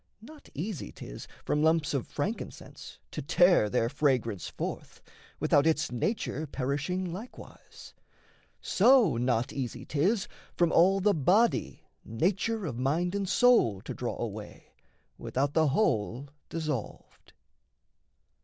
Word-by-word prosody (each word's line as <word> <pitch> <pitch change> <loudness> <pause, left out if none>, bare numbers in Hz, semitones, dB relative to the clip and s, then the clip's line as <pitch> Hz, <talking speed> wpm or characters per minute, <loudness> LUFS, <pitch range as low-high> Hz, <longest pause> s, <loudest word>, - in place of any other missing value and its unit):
Not 300 +4 -14
easy 175 +3 -4
'tis - - -10 0.2
from 150 - 0
lumps 160 -1 +2
of 135 -4 -2
frankincense - - -6
To - - -5
tear 175 - +4
their 115 0 +1
fragrance 125 - 0
forth, - - -6 0.4
without 145 +2 +3
its 160 -1 +1
nature 155 - -2
Perishing 145 +7 -2
likewise: 220 +7 -11 0.7
so, 225 - +4
not 120 -1 0
easy 125 -4 -5
'tis 190 +8 0 0.3
From 170 -2 +3
all 195 +3 +4
the 205 +1 +3
body 195 - +1 0.2
nature 195 - -1
of 125 -6 -4
mind 165 +8 0
and 200 -2 -2
soul 225 - +4
To - - -6
draw - - -4
away, - - -7 0.5
without 140 +2 -1
the 160 -1 +3
whole 135 - 0 0.2
dissolved. 155 -8 -6
155 Hz, 120 wpm, -29 LUFS, 130-190 Hz, 0.7 s, tear